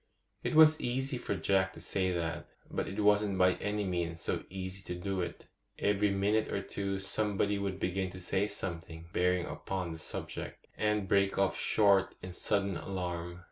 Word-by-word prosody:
It -, -, -1 dB
was 155 Hz, 0 st, +8 dB
easy 130 Hz, +1 st, -1 dB
for 100 Hz, -, -2 dB
Jack 95 Hz, 0 st, +2 dB
to -, -, -11 dB
say 95 Hz, -1 st, 0 dB
that, 85 Hz, -2 st, -2 dB, 0.2 s
but -, -, -2 dB
it 100 Hz, +2 st, -2 dB
wasn't 105 Hz, -1 st, +4 dB
by 90 Hz, 0 st, +5 dB
any 105 Hz, +1 st, -1 dB
means 85 Hz, -3 st, -2 dB
so -, -, -1 dB
easy 95 Hz, +1 st, -5 dB
to 90 Hz, 0 st, -4 dB
do 95 Hz, 0 st, -1 dB
it. 85 Hz, -, -5 dB, 0.3 s
Every 105 Hz, 0 st, +2 dB
minute 100 Hz, +3 st, +2 dB
or -, -, -1 dB
two 100 Hz, -1 st, -2 dB
somebody 100 Hz, +1 st, 0 dB
would 100 Hz, -1 st, -2 dB
begin 95 Hz, +1 st, -1 dB
to 95 Hz, -, -9 dB
say 95 Hz, +3 st, 0 dB
something 85 Hz, -5 st, -5 dB
bearing 90 Hz, 0 st, +2 dB
upon 95 Hz, -3 st, -4 dB
the 80 Hz, -, -6 dB
subject, -, -, -6 dB
and 105 Hz, -2 st, +1 dB
break 100 Hz, 0 st, +3 dB
off 95 Hz, -1 st, +2 dB
short 100 Hz, -3 st, +3 dB
in 90 Hz, 0 st, -6 dB
sudden 100 Hz, -1 st, 0 dB
alarm. 90 Hz, -2 st, -4 dB
95 Hz, 180 wpm, -32 LUFS, 90-105 Hz, 0.3 s, was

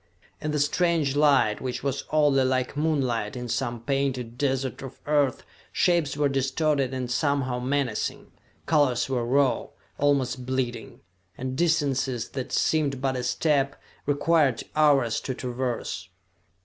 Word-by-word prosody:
In 155 Hz, -, -2 dB
the 150 Hz, -, 0 dB
strange 150 Hz, -1 st, +1 dB
light, 140 Hz, -7 st, +3 dB
which 130 Hz, -1 st, -4 dB
was 140 Hz, -1 st, -2 dB
oddly 145 Hz, -3 st, +3 dB
like 130 Hz, 0 st, 0 dB
moonlight 130 Hz, -8 st, 0 dB
in 125 Hz, -1 st, -5 dB
some 120 Hz, -1 st, -2 dB
painted 130 Hz, -3 st, -1 dB
desert 135 Hz, -2 st, -1 dB
of 135 Hz, -2 st, -9 dB
Earth, 145 Hz, -3 st, +1 dB, 0.3 s
shapes 170 Hz, -5 st, +1 dB
were 145 Hz, -1 st, +3 dB
distorted 135 Hz, 0 st, 0 dB
and 130 Hz, -2 st, -3 dB
somehow 135 Hz, -2 st, 0 dB
menacing, 130 Hz, -3 st, -2 dB, 0.3 s
colors 145 Hz, -6 st, +2 dB
were 130 Hz, -3 st, -1 dB
raw, 130 Hz, +2 st, +2 dB, 0.3 s
almost 135 Hz, -3 st, +1 dB
bleeding 125 Hz, -2 st, -3 dB, 0.4 s
and 130 Hz, +1 st, -4 dB
distances 135 Hz, -7 st, 0 dB
that 130 Hz, -2 st, -5 dB
seemed 145 Hz, -4 st, +1 dB
but 135 Hz, 0 st, 0 dB
a 125 Hz, -, -2 dB
step 140 Hz, +2 st, 0 dB, 0.3 s
required 145 Hz, -3 st, +2 dB
hours 140 Hz, -7 st, +3 dB
to 130 Hz, -, -4 dB
traverse. 125 Hz, -1 st, -4 dB
135 Hz, 135 wpm, -26 LUFS, 125-145 Hz, 0.4 s, light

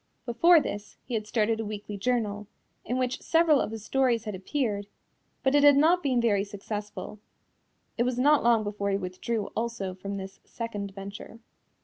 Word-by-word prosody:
Before 330 Hz, +9 st, +6 dB
this, 205 Hz, -7 st, -6 dB
he 250 Hz, -, -7 dB
had 215 Hz, -2 st, -2 dB
started 220 Hz, 0 st, +1 dB
a -, -, -1 dB
weekly 210 Hz, -1 st, -6 dB
journal, 210 Hz, -2 st, -1 dB, 0.4 s
in 250 Hz, -, -2 dB
which 255 Hz, -1 st, -1 dB
several 325 Hz, -3 st, +4 dB
of -, -, -2 dB
his 220 Hz, -1 st, -7 dB
stories 250 Hz, -4 st, +2 dB
had 210 Hz, -, -5 dB
appeared, 205 Hz, +1 st, -2 dB, 0.6 s
but 265 Hz, -, +3 dB
it 290 Hz, -, +5 dB
had 290 Hz, -1 st, +8 dB
not 335 Hz, +5 st, +4 dB
been 260 Hz, -5 st, +1 dB
very 210 Hz, -4 st, +2 dB
successful. 210 Hz, +1 st, -6 dB, 0.8 s
It -, -, +4 dB
was 250 Hz, 0 st, -1 dB
not 290 Hz, +3 st, +4 dB
long 230 Hz, -2 st, +4 dB
before 205 Hz, -1 st, -2 dB
he 195 Hz, -, +1 dB
withdrew 200 Hz, +3 st, -3 dB
also 225 Hz, -5 st, -2 dB
from 200 Hz, +2 st, -6 dB
this 190 Hz, 0 st, -8 dB
second 210 Hz, -4 st, -5 dB
venture. 200 Hz, +3 st, -8 dB
225 Hz, 175 wpm, -28 LUFS, 205-250 Hz, 0.8 s, had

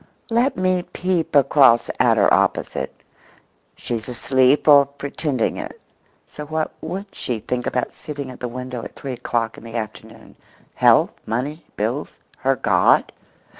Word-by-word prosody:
(Let 240 Hz, +4 st, +2 dB
me 185 Hz, -1 st, +1 dB
peep 180 Hz, -3 st, -2 dB
across 135 Hz, -3 st, +5 dB
at -, -, +4 dB
her -, -, +4 dB
opposite; -, -, 0 dB, 0.8 s
she's 115 Hz, 0 st, -5 dB
asleep 130 Hz, +3 st, +2 dB
or 140 Hz, -2 st, +7 dB
pretending 140 Hz, -2 st, -2 dB
it; -, -, -7 dB, 0.5 s
so 150 Hz, -, -8 dB
what 155 Hz, 0 st, -2 dB
would 185 Hz, +5 st, -5 dB
she 120 Hz, -3 st, -3 dB
think 125 Hz, +3 st, -3 dB
about 125 Hz, -, -2 dB
sitting 140 Hz, -3 st, -7 dB
at 125 Hz, -, -12 dB
the 125 Hz, -, -3 dB
window 125 Hz, 0 st, -6 dB
at -, -, -9 dB
three 135 Hz, -2 st, -6 dB
o'clock 115 Hz, -2 st, -2 dB
in -, -, -17 dB
the 115 Hz, 0 st, -9 dB
afternoon? 110 Hz, -2 st, -7 dB, 0.4 s
Health, -, -, +4 dB, 0.2 s
money, 135 Hz, +8 st, -3 dB
bills, 115 Hz, +8 st, -3 dB, 0.2 s
her 135 Hz, +1 st, +1 dB
God?) -, -, +3 dB
135 Hz, 145 wpm, -21 LUFS, 120-150 Hz, 0.8 s, or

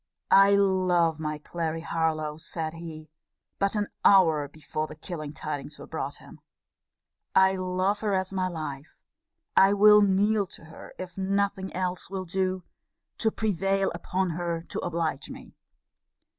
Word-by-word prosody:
I 195 Hz, +1 st, +7 dB
love 185 Hz, -5 st, +2 dB
my 155 Hz, -1 st, -3 dB
Clary 165 Hz, +1 st, -4 dB
Harlowe, 160 Hz, -2 st, -1 dB
said 160 Hz, 0 st, -4 dB
he, 160 Hz, -2 st, -9 dB, 0.5 s
but 200 Hz, +1 st, +1 dB
an 210 Hz, -1 st, +1 dB, 0.2 s
hour 160 Hz, -7 st, +5 dB
before 155 Hz, +1 st, -5 dB
the 150 Hz, -, -10 dB
killing 155 Hz, -2 st, -6 dB
tidings 150 Hz, -1 st, -6 dB
were -, -, -10 dB
brought -, -, -4 dB
him; -, -, -14 dB, 1.0 s
I 190 Hz, 0 st, +5 dB
love 185 Hz, +2 st, 0 dB
her 210 Hz, -2 st, 0 dB
as 190 Hz, 0 st, -2 dB
my 185 Hz, -1 st, 0 dB
life: 155 Hz, -4 st, -7 dB, 0.6 s
I 195 Hz, +1 st, +6 dB
will 210 Hz, +1 st, +7 dB
kneel 205 Hz, +1 st, +3 dB
to 165 Hz, -, -12 dB
her, 160 Hz, -, -12 dB
if 185 Hz, 0 st, -7 dB
nothing 195 Hz, 0 st, 0 dB
else 180 Hz, -1 st, -2 dB
will 190 Hz, -1 st, -4 dB
do, 185 Hz, +1 st, -1 dB, 0.6 s
to 220 Hz, -, +2 dB
prevail 195 Hz, -2 st, 0 dB
upon 180 Hz, +2 st, -1 dB
her 170 Hz, 0 st, -3 dB
to -, -, -4 dB
oblige 165 Hz, -4 st, -2 dB
me. -, -, -11 dB
180 Hz, 145 wpm, -27 LUFS, 160-195 Hz, 1.0 s, I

